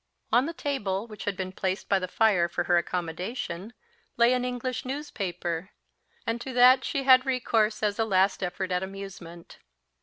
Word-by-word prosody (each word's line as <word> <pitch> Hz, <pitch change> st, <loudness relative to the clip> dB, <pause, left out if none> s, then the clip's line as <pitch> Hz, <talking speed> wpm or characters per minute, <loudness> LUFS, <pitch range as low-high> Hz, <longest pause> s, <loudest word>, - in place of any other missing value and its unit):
On 250 Hz, +4 st, +4 dB
the 335 Hz, -, -4 dB
table, 215 Hz, -, -2 dB
which 215 Hz, -3 st, -9 dB
had 200 Hz, -2 st, -2 dB
been 185 Hz, -1 st, -3 dB
placed 190 Hz, 0 st, -3 dB
by 195 Hz, -, +3 dB
the 185 Hz, -, -3 dB
fire 180 Hz, -3 st, +3 dB
for -, -, -1 dB
her 175 Hz, -, +2 dB
accommodation, 180 Hz, +4 st, -3 dB, 0.5 s
lay 235 Hz, +1 st, +5 dB
an 250 Hz, -1 st, 0 dB
English 250 Hz, 0 st, -3 dB
newspaper; 195 Hz, -, -4 dB, 0.6 s
and 230 Hz, +1 st, -2 dB
to 260 Hz, +1 st, -6 dB
that 250 Hz, +2 st, +6 dB
she 275 Hz, -3 st, -2 dB
had 260 Hz, -1 st, +7 dB
recourse, 225 Hz, -5 st, +1 dB
as 205 Hz, 0 st, 0 dB
a -, -, +4 dB
last 195 Hz, -1 st, +2 dB
effort 185 Hz, +1 st, -3 dB
at 180 Hz, 0 st, +1 dB
amusement. 190 Hz, -3 st, -9 dB
205 Hz, 175 wpm, -27 LUFS, 185-250 Hz, 0.6 s, had